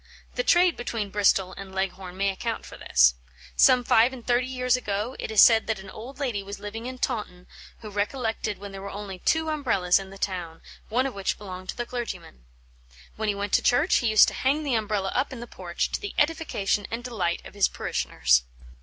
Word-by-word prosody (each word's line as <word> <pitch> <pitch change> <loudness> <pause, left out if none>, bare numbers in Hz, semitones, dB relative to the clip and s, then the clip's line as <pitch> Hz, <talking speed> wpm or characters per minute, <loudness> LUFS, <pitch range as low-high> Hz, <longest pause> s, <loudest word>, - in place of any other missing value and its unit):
The - - -1
trade 355 -5 +4
between 225 -4 -3
Bristol 190 -2 +2
and 190 -1 -9
Leghorn 190 -1 -3
may 200 +1 +2
account 230 +4 -4
for - - -10
this. 60 0 +4 0.4
Some 250 - +6
five 235 +1 +4
and 255 -3 -10
thirty 245 +1 +2
years 250 -1 +1
ago 215 0 -3
it - - -4
is 220 -2 +6
said 225 -1 +6
that 220 - 0
an 190 - -10
old 250 +5 -9
lady 245 -8 -2
was 200 +1 -7
living 225 +3 -6
in 255 0 -6
Taunton 210 -8 -3 0.4
who 215 - -7
recollected 215 0 -2
when 200 0 -9
there 195 0 -8
were 200 - -6
only 195 -2 -7
two 320 - +1
Umbrellas 225 -13 +2
in 195 0 -8
the 195 - -11
town, 175 -4 -4 0.3
one 250 +4 +1
of 270 - -3
which 195 -1 -2
belonged 185 -2 -9
to - - -4
the 240 - -2
clergyman. 185 - -6 0.7
When 215 0 -2
he 205 - 0
went 200 0 -4
to - - +5
church, 290 +8 +3
he 240 - 0
used 215 -1 +7
to - - -9
hang 285 +4 +1
the 280 -4 -1
Umbrella 210 -3 0
up 260 +3 0
in 260 - -7
the 240 - -6
porch, 175 -6 -3
to - - -2
the 410 - -6
edification 295 -11 0
and 230 +1 -4
delight 190 -9 -2
of - - -11
his 200 -1 +3
parishioners. 60 0 +1
210 Hz, 215 wpm, -26 LUFS, 195-250 Hz, 0.7 s, used